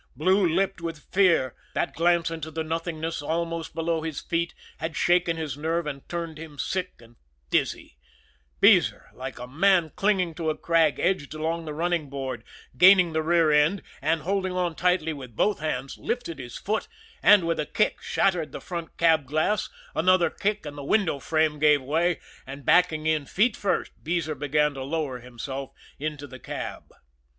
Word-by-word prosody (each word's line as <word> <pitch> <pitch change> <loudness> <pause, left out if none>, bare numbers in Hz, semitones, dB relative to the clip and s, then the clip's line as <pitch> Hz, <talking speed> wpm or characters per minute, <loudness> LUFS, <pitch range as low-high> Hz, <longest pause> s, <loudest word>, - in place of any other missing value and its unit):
Blue 190 +6 +3
lipped 190 +2 0
with 165 -2 -7
fear 170 -10 +4 0.2
that - - -1
glance 170 0 +2
into 160 -1 -5
the 160 0 -3
nothingness 165 0 -3
almost 165 +1 -3
below 165 0 0
his 160 -3 -4
feet 170 0 -2 0.2
had 160 +1 -4
shaken 175 -1 +2
his 155 -4 -3
nerve 165 +3 -1
and 140 -2 -6
turned 170 -3 -4
him 155 -2 -10
sick 185 +5 -3
and 115 +1 -19 0.3
dizzy - - -1 0.6
Beezer, - - +4
like - - -7
a 125 - -6
man 165 +4 +3
clinging 190 -4 +1
to 160 0 -2
a 155 - -2
crag, 165 -5 +2
edged 170 -5 0
along 165 +2 -2
the 155 - -5
running 170 -2 -1
board, 135 -1 -5 0.3
gained 180 -2 +7
the 160 - +1
rear 165 -1 +3
end, 150 +6 +3 0.2
and, 160 0 +1
holding 190 +1 -1
on 180 -2 0
tightly 175 -2 +1
with 130 -6 -10
both 210 - +1
hands, 150 -3 -3
lifted 235 - -3
his 120 -2 -7
foot, 215 +2 -2 0.3
and 205 -4 +6
with 165 0 0
a 150 - -1
kick 215 - 0
shattered 180 -5 0
the - - -6
front 170 -2 -7
cab 160 -4 +3
glass; 155 +9 0 0.2
another 185 +1 +3
kick 210 -2 -2
and 145 -1 -6
the - - -6
window 165 -2 +1
frame 155 +1 +1
gave 150 -1 +5
way, 160 +6 0 0.3
and, 135 0 -9
backing 160 -2 +3
in 155 -3 +1
feet 215 +4 +2
first, 200 - -1
Beezer 165 -1 -1
began 150 0 +1
to 135 - -7
lower 140 -3 -3
himself 130 +3 -6 0.3
into 150 -1 -4
the 130 -1 -11
cab. - - -6
160 Hz, 175 wpm, -26 LUFS, 150-175 Hz, 0.6 s, gained